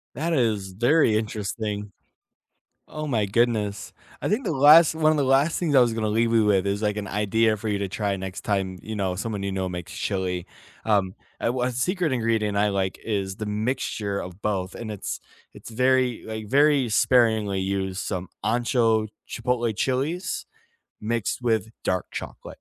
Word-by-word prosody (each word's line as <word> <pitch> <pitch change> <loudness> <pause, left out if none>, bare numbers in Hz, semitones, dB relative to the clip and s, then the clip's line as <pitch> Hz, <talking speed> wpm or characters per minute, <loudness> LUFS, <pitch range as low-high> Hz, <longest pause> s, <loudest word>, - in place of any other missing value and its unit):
That 165 +5 -1
is 110 -8 0
very 120 - +3
interesting. 105 -1 -3 1.0
Oh 155 0 -5
my 115 -7 +1
goodness. 105 -2 0 0.3
I - - -1
think 225 +5 0
the 185 - 0
last 150 +3 +7
one 155 -1 +3
of 155 - +1
the 145 - +2
last 135 +5 +3
things 165 -5 0
I - - +8
was 120 -2 +3
gonna 110 -1 -1
leave 115 +2 +2
you 110 -2 +4
with 100 -2 +3
is, 100 +2 -1
like, 105 -1 0
an 100 -1 -4
idea 110 +2 +2
for 110 - -5
you 105 - 0
to 100 - -1
try 100 +1 -1
next 95 -1 -6
time, 95 -3 -1
you 110 - -5
know, 95 -3 -1
someone 105 0 -3
you 100 - -2
know 95 -1 -2
makes 90 -2 -6
chili, 90 -3 -2 0.4
um, 100 -4 +1 0.2
a - - -3
w 125 +2 -1
a - - -2
secret 165 +7 0
ingredient 115 -4 0
I 105 +1 +3
like 95 -1 -1
is 100 -3 -2
the 110 - -4
mixture 105 -2 -2
of 90 +2 -8
both, 95 -3 -2
and 110 -2 -6
it's 105 - -5 0.3
it's - - -11
very, 125 0 +2
like, 110 -1 -6
very 140 0 +4
sparingly 110 -4 +3
used, 95 0 -2
some 95 -2 -4 0.2
ancho 115 -1 +2 0.2
chipotle 120 -2 -1
chilies 140 - -1 0.6
mixed 115 +2 -2
with 110 -3 0
dark 90 -1 0
chocolate. - - -7
110 Hz, 180 wpm, -25 LUFS, 100-125 Hz, 1.0 s, I